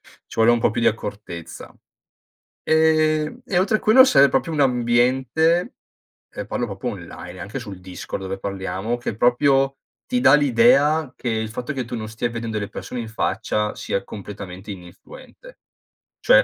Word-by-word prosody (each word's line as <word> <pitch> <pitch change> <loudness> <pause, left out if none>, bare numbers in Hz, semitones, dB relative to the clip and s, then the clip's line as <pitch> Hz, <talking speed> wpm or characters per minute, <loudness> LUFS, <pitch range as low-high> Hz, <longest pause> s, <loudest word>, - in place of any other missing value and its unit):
Ci - - -18
vuole 115 +1 +4
un 120 - +3
po' 115 - +1
più 115 - -2
di - - +5
accortezza. 100 -6 -7 0.9
Ehm, 155 +5 +2
e 180 -7 +1
oltre 215 +3 +2
quello 245 +5 +6
sere, 140 - +5
proprio 165 - 0
un 150 -2 0
ambiente 130 +7 +2 0.6
ehm, 105 - -6
parlo 120 +3 -2
proprio 100 +3 -7
online, 90 -2 -9
e 95 - -11
anche 110 +7 -5
sul 100 -6 -9
Discord 90 +1 -7
dove 95 +1 -4
parliamo, 95 +4 -3
che 120 -3 -5
proprio 135 +3 +2 0.3
ti 250 -1 0
dà 195 - +6
l'idea 150 - +4
che, 125 - -4
il 110 -1 -1
fatto 125 +4 -4
che 130 -3 -3
tu 120 +1 -6
non 110 -1 -5
stia 115 +2 -3
vedendo 115 -2 -4
le 100 - -4
persone 125 - -6
in 115 - -6
faccia 105 -1 -1
sia 100 - -3
completamente 100 -1 -9
ininfluente. 100 - -13 0.6
Cioè, - - +5
120 Hz, 170 wpm, -22 LUFS, 105-150 Hz, 0.9 s, quello